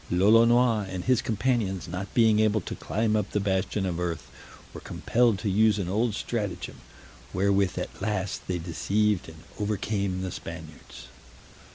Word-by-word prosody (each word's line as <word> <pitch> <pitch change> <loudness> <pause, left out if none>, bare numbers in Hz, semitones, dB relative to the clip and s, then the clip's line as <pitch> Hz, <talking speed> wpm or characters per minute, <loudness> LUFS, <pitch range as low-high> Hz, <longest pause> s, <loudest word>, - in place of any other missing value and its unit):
Lolonois 115 +3 +4
and 95 -1 -4
his 125 -2 +3
companions 110 -6 -1
not 90 +3 -5
being 110 -3 +5
able 110 0 +3
to - - -6
climb 110 0 -1
up 105 -2 0
the 105 - -1
bastion 95 0 0
of 90 -2 -2
earth, 85 -2 -4 0.4
were - - -8
compelled 115 -3 +1
to 105 - -4
use 105 +2 +3
an 95 -4 -2
old 105 +3 0
stratagem, 105 -7 -4 0.6
wherewith 100 0 +2
at - - -5
last 100 -2 -2
they 90 - -1
deceived 100 +3 0
and 80 0 -14 0.2
overcame 100 -2 -1
the 95 - -3
Spaniards. 80 -2 -9
100 Hz, 155 wpm, -27 LUFS, 95-110 Hz, 0.6 s, being